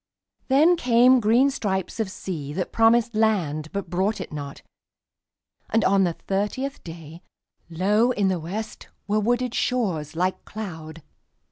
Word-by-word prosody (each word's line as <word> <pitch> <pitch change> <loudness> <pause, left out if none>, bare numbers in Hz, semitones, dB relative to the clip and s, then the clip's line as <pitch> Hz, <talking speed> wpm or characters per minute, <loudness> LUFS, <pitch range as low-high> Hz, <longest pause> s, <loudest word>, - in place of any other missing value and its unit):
Then 310 +7 +4
came 250 -1 +5
green 240 +5 +3
stripes 190 -5 -3
of 220 -3 -1
sea 155 -7 -6
that 185 +2 -3
promised 230 +1 +3
landBut 195 -5 0
brought 190 +5 -1
it 185 - -7
not, 140 -2 -7 1.1
and 225 0 +2
on 195 0 +4
the 175 - -1
thirtieth 210 +11 -3
dayLow 170 +5 -3
in 205 -5 +1
the 185 -2 0
West 205 +7 -6 0.2
were 210 +1 +1
wooded 240 +3 0
shores 180 - -1
like 185 +2 -1
cloud. 165 -7 -8
200 Hz, 130 wpm, -24 LUFS, 170-230 Hz, 1.1 s, came